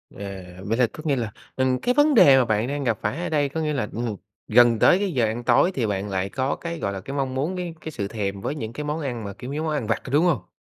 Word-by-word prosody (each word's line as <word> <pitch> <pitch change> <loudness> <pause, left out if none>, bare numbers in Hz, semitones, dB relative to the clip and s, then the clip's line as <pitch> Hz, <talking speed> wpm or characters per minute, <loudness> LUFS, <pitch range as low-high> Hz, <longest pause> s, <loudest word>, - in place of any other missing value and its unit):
À, 100 -2 -7 0.2
vậy 115 +3 0
là 125 - +4
tức 155 - -10
nghĩa 145 -3 +2
là, 115 -5 -3 0.2
ừm, 130 -1 +1
cái 250 - +1
vấn 290 +2 +4
đề 140 - +8
mà 130 - +4
bạn 110 +1 0
đang 145 0 -3
gặp 115 -5 0
phải 145 - -2
ở - - -2
đây 145 -3 +1
có 160 +3 -3
nghĩa 155 -1 -1
là, 135 -7 -1
ừm, 115 -2 -2 0.3
gần 120 0 +5
tới 180 - +5
cái 200 -2 -1
giờ 120 -3 +2
ăn 110 +2 -3
tối 125 +10 +4
thì 125 -8 -1
bạn 100 -1 -2
lại 95 0 -1
có 130 +5 -1
cái 170 -1 -6
gọi 100 - -2
là, 95 - -5
cái 135 +8 -7
mong 135 -2 -1
muốn 150 +8 -1
cái 175 -2 -4
cái 160 - -6
sự 100 -9 -3
thèm 100 -2 -3
với 140 - -3
những 115 -6 -5
cái 150 - -5
món 150 +2 -2
ăn 125 -6 -4
mà 100 -1 -6
kiểu 125 +7 -7
giống 155 +2 -2
món 155 - -1
ăn 140 -7 -2
vặt, 115 - -1
có - - -8
đúng 150 +5 +4
hông? 150 - 0
130 Hz, 310 wpm, -24 LUFS, 110-150 Hz, 0.3 s, đề